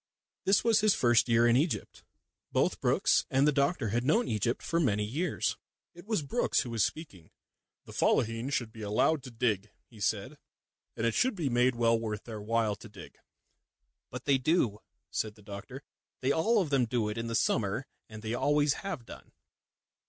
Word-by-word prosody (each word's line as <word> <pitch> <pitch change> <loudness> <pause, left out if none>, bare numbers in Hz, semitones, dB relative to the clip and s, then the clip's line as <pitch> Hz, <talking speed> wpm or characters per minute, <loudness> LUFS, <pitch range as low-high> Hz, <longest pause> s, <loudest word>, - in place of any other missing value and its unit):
This 195 +1 +4
was 225 -2 +4
his 215 -1 +4
first 120 0 +3
year 115 0 +4
in 120 0 +4
Egypt. 150 +5 -1 0.5
Both - - +1
Brookes - - +2
and 135 +2 +3
the - - +5
doctor 140 - +1
had 120 +4 0
known 220 - +2
Egypt 110 +2 -1
for 165 - 0
many 105 -10 +1
years. 150 +11 -1 0.4
It 175 +3 -14
was 215 -9 0
Brookes 140 - +1
who 120 - -6
was 115 -4 +1
speaking. 100 - -5 0.6
"The - - -11
Fellaheen 115 +3 +1
should 120 -5 -2
be 110 - -10
allowed 110 +9 +1
to 130 - -9
dig," 110 -3 -1 0.2
he 115 - -17
said, 110 +8 -2 0.6
"and 115 - -1
it 115 - +1
should 255 -2 +2
be 160 -7 -1
made 125 +1 +2
well 115 -1 +3
worth 110 -2 -4
their 110 -3 -7
while 110 0 0
to - - -12
dig." - - -13 0.9
"But - - -8
they 140 -2 +3
do," 130 - +1 0.3
said 110 -1 -2
the 105 - -18
doctor. 105 +7 -9 0.4
"They 130 - +2
all 215 +10 +2
of 150 - -7
them 135 -3 +3
do 115 -2 -1
it 105 +1 -4
in 115 - -3
the 115 - -2
summer, 110 +3 0 0.2
and 110 0 -10
they 110 +1 -3
always 145 +3 +2
have 185 - -5
done." - - -12
120 Hz, 190 wpm, -30 LUFS, 110-145 Hz, 0.9 s, the